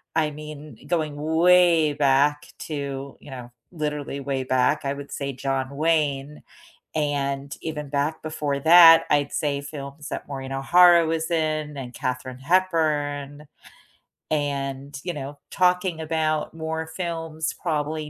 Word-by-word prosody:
I 155 -2 +1
mean, 150 0 -10
going 155 -4 -1
way 165 +1 +4
back 145 +1 +2
to, 140 -2 -5
you 145 - -12
know, 125 -2 -9 0.2
literally 150 -3 -4
way 135 -1 -2
back, 130 +4 +1
I 135 - 0
would 140 0 -9
say 140 -1 -3
John 135 0 -2
Wayne 150 -2 0 0.5
and 140 -2 -2
even 150 -3 -5
back 145 +3 -1
before 150 -3 -3
that, 165 +2 +8
I'd 145 -1 +2
say 140 -2 -1
films 140 0 -8
that - - -5
Maureen 135 -1 -6
O'Hara 170 +5 +5
was 160 +1 -2
in 155 -2 -1
and 125 -2 -7
Katharine 130 +1 -4
Hepburn. 150 -3 0 0.9
And, 140 -1 -2
you 175 - -3
know, 145 -1 -7
talking 180 -2 +1
about 155 -1 -1
more 160 0 -4
films 165 -2 -4
probably 155 -1 -2
150 Hz, 135 wpm, -24 LUFS, 140-160 Hz, 0.9 s, that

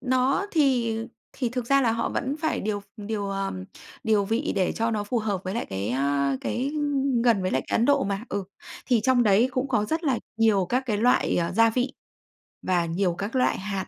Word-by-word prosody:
Nó 260 +8 +1
thì, 255 - +2
ờ, 225 - -5 0.3
thì 250 -4 -2
thực 245 -1 -4
ra 275 +1 +4
là 225 -2 +2
họ 230 0 -1
vẫn 275 +2 -2
phải 315 -1 0
điều 205 -1 -2
v - - -19 0.2
điều, 205 -2 -3
ờ, 195 0 -2 0.5
điều 215 -2 +3
vị 230 +9 -1
để 185 -2 +1
cho 230 +1 -1
nó 210 -2 -1
phù 235 +4 -1
hợp 205 -4 -2
với 185 - -3
lại 235 - -2
cái, 95 +2 -3
a, 140 +1 +1
cái, 265 +4 -2
ưm, 280 -5 0
gần 225 -6 +3
với 185 - 0
lại - - 0
cái - - 0
Ấn 230 - +3
Độ 285 -6 +3
mà. 200 +3 -3
Ừ. 200 -1 -3 0.4
Thì 245 -4 +3
trong 250 +1 +3
đấy 215 +4 +4
cũng 260 +2 -1
có 225 -5 +1
rất 320 +7 -2
là 265 -5 +1 0.2
nhiều 215 -5 +3
các 250 +5 +1
cái 215 -4 0
loại, 245 +3 +3
à, 170 +1 0
gia 230 +2 +4
vị 250 +3 -1 0.7
và 175 -2 +1
nhiều 175 +1 0
các 205 +6 -4
loại 255 - +2
hạt 195 -1 -4
225 Hz, 235 wpm, -25 LUFS, 195-255 Hz, 0.7 s, ra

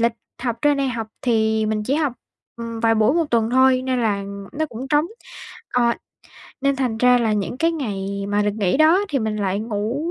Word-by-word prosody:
lịch 235 0 +3 0.3
học 235 -3 -1
trên 290 -1 +4
đây 275 -1 0
học 230 -3 -3 0.2
thì 220 -2 +2
mình 215 -1 -1
chỉ 265 +6 0
học, 295 -5 +1 0.4
ừm, 230 -1 -6
vài 225 -1 +3
buổi 220 +6 +3
một 335 -1 +2
tuần 230 -1 +2
thôi 260 0 +4
nên 255 -1 0
là 200 -3 0 0.3
nó 315 +2 -1
cũng 255 +1 -7
trống. 300 +3 +3 0.7
Ờ, 240 -1 +3 0.7
nên 275 0 +1
thành 245 -4 -1
ra 250 0 +5
là 225 -2 +1
những 210 +4 -2
cái 330 +3 +1
ngày 200 -8 -3
mà 205 0 +1
được 205 - +1
nghỉ 195 +2 +2
đó 315 +5 +5
thì 275 - 0
mình 220 -2 -2
lại 200 0 -1
ngủ 230 +9 -2
235 Hz, 215 wpm, -21 LUFS, 215-270 Hz, 0.7 s, ra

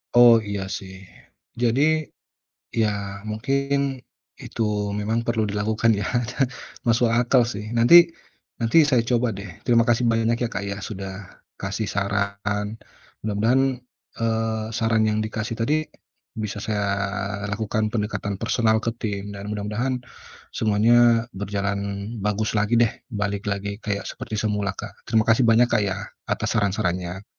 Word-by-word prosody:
Oh 120 -1 +9
iya 100 -1 -4
sih. 95 -1 -10 0.7
Jadi, 120 +3 +2 1.0
ya 110 - +3 0.4
mungkin 140 +4 0 0.4
itu 115 - -5 0.4
memang 110 +2 0
perlu 115 -2 +1
dilakukan 110 +2 +1
ya - - -2 0.8
masuk 115 0 +3
akal 120 +2 +3
sih, 105 -2 -5
nanti 165 +9 +7 0.5
nanti 150 +8 +5
saya 130 -5 +3
coba 120 -1 +2
deh. 100 -1 -7 0.2
Terima 115 -1 +4
kasih 120 +1 +3
banyak 115 +1 +2
ya - - 0
Kak 100 - -3
ya, 100 - -3
sudah 95 -2 -8 0.2
kasih 100 +2 -3
saran. 100 +1 -2 0.5
Mudah-mudahan 125 +5 +2 0.4
eee, 110 -1 0
saran 110 -1 +2
yang 105 - 0
dikasih 110 +1 -3
tadi 150 +7 0 0.5
bisa 105 -1 -4
saya 105 -2 -1 0.6
lakukan 110 +1 -1
pendekatan 105 -2 -2
personal 115 0 +2
ke 115 - 0
tim, 100 -1 -3
dan 100 +1 -7
mudah-mudahan 110 +5 -2 0.5
semuanya 115 +2 +4
berjalan 100 0 -2 0.4
bagus 105 +1 0
lagi 105 +2 +2
deh, 115 -1 +4 0.2
balik 100 -2 -3
lagi 100 +1 -3
kayak 100 -3 -3
seperti 110 - -6
semula 105 -2 -1
Kak, - - -9
terima 110 -1 +3
kasih 115 +1 +4
banyak 115 +2 +6
Kak - - +4
ya, 100 -2 -1 0.3
atas - - -1
saran-sarannya. 95 -3 -1
110 Hz, 135 wpm, -24 LUFS, 100-115 Hz, 1.0 s, Oh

